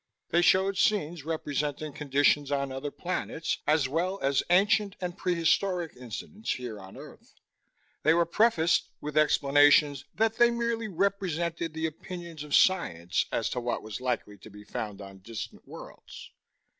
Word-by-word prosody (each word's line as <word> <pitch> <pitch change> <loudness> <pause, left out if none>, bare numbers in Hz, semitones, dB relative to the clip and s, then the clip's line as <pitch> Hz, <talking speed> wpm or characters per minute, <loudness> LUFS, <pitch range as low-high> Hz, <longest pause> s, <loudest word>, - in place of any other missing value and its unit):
They 170 - +3
showed 190 +2 +3
scenes 170 -7 +1
representing 150 -1 -3
conditions 145 0 +2
on 140 -1 -1
other 135 +2 -4
planets, 165 -1 -3
as 150 -2 +3
well 180 +7 -1
as 135 0 +2
ancient 200 +2 +3
and 180 -1 -4
prehistoric 175 0 0
incidents 125 - -5
here 120 -4 -6
on 95 0 -12
earth. - - -14 0.7
They 155 +2 +4
were 170 0 +3
prefaced 175 -3 +2
with 150 0 -6
explanations 145 -1 +4
that 225 0 +1
they 240 0 +6
merely 235 -1 -1
represented 170 -4 -1
the 160 0 -2
opinions 170 0 -7
of 150 -1 0
science 90 - +2
as - - 0
to - - -2
what 120 0 -3
was 110 +3 -7
likely 120 -5 -3
to 110 - -13
be 105 0 -13
found 105 -1 -6
on 95 0 -12
distant 110 +3 -8
worlds. - - -11
155 Hz, 150 wpm, -28 LUFS, 135-180 Hz, 0.7 s, they